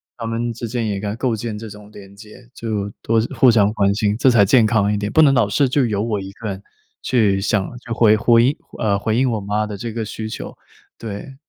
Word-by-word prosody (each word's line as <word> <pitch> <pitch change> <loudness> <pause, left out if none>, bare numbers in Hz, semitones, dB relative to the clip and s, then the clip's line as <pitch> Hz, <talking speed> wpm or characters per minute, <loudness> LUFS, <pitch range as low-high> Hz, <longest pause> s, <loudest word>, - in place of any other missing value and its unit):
他 115 -2 -6
们 115 +1 -2
之 120 +1 -6
间 115 0 -2
也 100 -2 -2
该 105 +1 -4
构 120 0 -1
建 110 0 -5
这 110 +1 -8
种 105 0 -13
连 100 -1 -14
接， 110 +4 -15
就 105 -3 -3
多 115 0 +1 0.2
互 130 - +5
相 105 -3 +4
关 100 -2 +2
心， 105 0 0
这 130 - +4
才 115 -5 +5
健 120 +4 +4
康 110 -2 +2
一 - - 0
点。 105 0 -3
不 160 - +5
能 140 -3 +5
老 120 -6 +2
是 140 +6 +2
就 130 0 +1
由 105 -2 -1
我 110 -3 -2
一 95 0 -8
个 110 +1 -6
人， 95 0 -6 0.4
去 105 -6 +1
想 100 -1 0
去 115 - -12
回 110 -2 +4
回 115 +1 +4
应 140 +4 +1 0.2
呃， 100 -2 0
回 110 +2 -1
应 130 +1 +2
我 110 -2 -2
妈 105 +2 -1
的 105 -1 -6
这 115 +3 -5
个 110 0 -4
需 110 +1 -6
求。 - - -7 0.4
对。 115 +5 -8
110 Hz, 265 characters per minute, -20 LUFS, 105-115 Hz, 0.4 s, 互